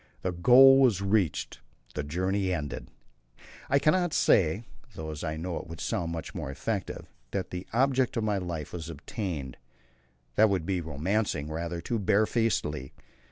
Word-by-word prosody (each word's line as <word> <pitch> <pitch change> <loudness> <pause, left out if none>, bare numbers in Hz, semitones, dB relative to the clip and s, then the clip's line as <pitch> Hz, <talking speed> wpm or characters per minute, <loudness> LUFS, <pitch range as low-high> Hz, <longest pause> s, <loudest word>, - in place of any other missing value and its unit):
The 95 - 0
goal 130 +9 +7
was 120 -8 +4
reached, 100 -5 0 0.3
the - - -2
journey 95 +6 -1
ended. 75 -5 -4 0.8
I 140 - +4
cannot 160 +4 +2
say 95 +4 +3 0.3
though 80 -1 -5
I 80 0 -2
know 85 +2 -3
it - - -7
would 80 -1 -9
sound 85 -1 -2
much 80 -1 -5
more - - -5
effective 70 - -4 0.2
that 95 +4 -3
the 90 +1 -5
object 130 +1 +2
of 115 - 0
my 105 -2 +1
life 85 -5 -5
was 85 -2 -5
attained. 80 - -5 0.8
That 110 0 +6
would 95 -5 0
be 95 -1 -1
romancing 80 +1 -1
rather 85 +2 -3
too 115 +6 -2
bare 105 +2 +3
facedly. 75 - -1
90 Hz, 160 wpm, -28 LUFS, 80-110 Hz, 0.8 s, goal